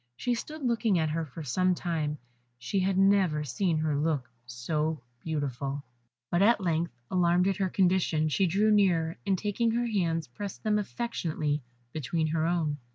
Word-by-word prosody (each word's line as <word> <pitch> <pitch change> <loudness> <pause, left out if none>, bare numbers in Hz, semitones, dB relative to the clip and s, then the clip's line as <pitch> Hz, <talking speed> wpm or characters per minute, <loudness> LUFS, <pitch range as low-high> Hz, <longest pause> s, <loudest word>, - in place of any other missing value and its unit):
She 245 - 0
stood 300 +5 -6
looking 230 -5 +2
at 160 -2 +1
her 160 0 -2
for 155 +4 -8
some 185 +7 +1
time, 155 -4 -2 0.4
she 125 +11 -2
had 190 0 +1
never 190 -6 +3
seen 160 - 0
her 155 -1 0
look 145 -5 -1 0.2
so 150 +6 -2 0.2
beautiful; 140 -2 -3 0.5
but 175 - +2
at 220 +2 +5
length, 170 -7 -1
alarmed 180 0 +3
at 195 -2 +1
her 190 -2 0
condition, 180 -4 +2
she 185 +5 +2
drew 205 +5 +3
nearer, 175 -6 +3
and 195 - +2
taking 210 +4 0
her 240 +1 +1
hands, 170 -8 0
pressed 195 +11 -7
them 210 -1 +2
affectionately 165 -10 -2 0.3
between 155 +2 -1
her 160 +1 +1
own. 160 -4 0
170 Hz, 165 wpm, -29 LUFS, 155-195 Hz, 0.5 s, at